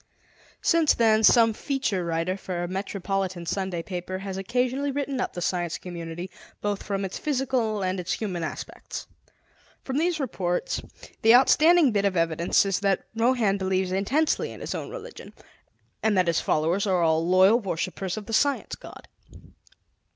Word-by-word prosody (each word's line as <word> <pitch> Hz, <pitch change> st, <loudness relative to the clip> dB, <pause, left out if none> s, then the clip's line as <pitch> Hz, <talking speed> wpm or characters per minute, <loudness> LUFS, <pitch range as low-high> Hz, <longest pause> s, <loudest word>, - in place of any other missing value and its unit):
Since 330 Hz, -3 st, +4 dB
then, 220 Hz, -1 st, +3 dB
some 225 Hz, 0 st, +6 dB
feature 245 Hz, -7 st, -2 dB
writer 170 Hz, +2 st, -1 dB
for 180 Hz, -2 st, -4 dB
a -, -, -2 dB
metropolitan 190 Hz, -1 st, -3 dB
Sunday 185 Hz, -1 st, -2 dB
paper 185 Hz, 0 st, -5 dB
has 195 Hz, 0 st, -6 dB
occasionally 250 Hz, +8 st, -1 dB
written 275 Hz, -1 st, -2 dB
up -, -, -3 dB
the 175 Hz, -, -4 dB
Science 175 Hz, -2 st, -1 dB
Community, 175 Hz, 0 st, -7 dB, 0.3 s
both 205 Hz, -1 st, -2 dB
from 200 Hz, -1 st, -2 dB
its 185 Hz, -, -5 dB
physical 255 Hz, -7 st, 0 dB
and 185 Hz, 0 st, -1 dB
its 180 Hz, +1 st, -2 dB
human 190 Hz, -6 st, -3 dB
aspects. 155 Hz, -, -6 dB, 0.8 s
From 265 Hz, +2 st, -2 dB
these 340 Hz, 0 st, 0 dB
reports, 185 Hz, -10 st, -2 dB, 0.4 s
the 225 Hz, +2 st, +7 dB
outstanding 310 Hz, +3 st, +5 dB
bit 200 Hz, -2 st, +1 dB
of 190 Hz, -2 st, +1 dB
evidence 165 Hz, +3 st, +2 dB
is 195 Hz, -2 st, 0 dB
that 195 Hz, -2 st, 0 dB
Rohan 225 Hz, -4 st, +2 dB
believes 190 Hz, -1 st, 0 dB
intensely 255 Hz, +12 st, 0 dB
in -, -, -10 dB
his -, -, -4 dB
own -, -, -5 dB
religion, -, -, -10 dB, 0.7 s
and 215 Hz, -2 st, +2 dB
that 185 Hz, -, +4 dB
his 165 Hz, -1 st, +1 dB
followers 170 Hz, +7 st, +1 dB
are 180 Hz, -3 st, +2 dB
all 160 Hz, 0 st, +2 dB
loyal 185 Hz, +6 st, +5 dB
worshippers 185 Hz, -1 st, -3 dB
of 210 Hz, -, -6 dB
the 225 Hz, -, -7 dB
Science 285 Hz, +4 st, +1 dB
God. -, -, -10 dB
195 Hz, 160 wpm, -26 LUFS, 180-240 Hz, 0.8 s, the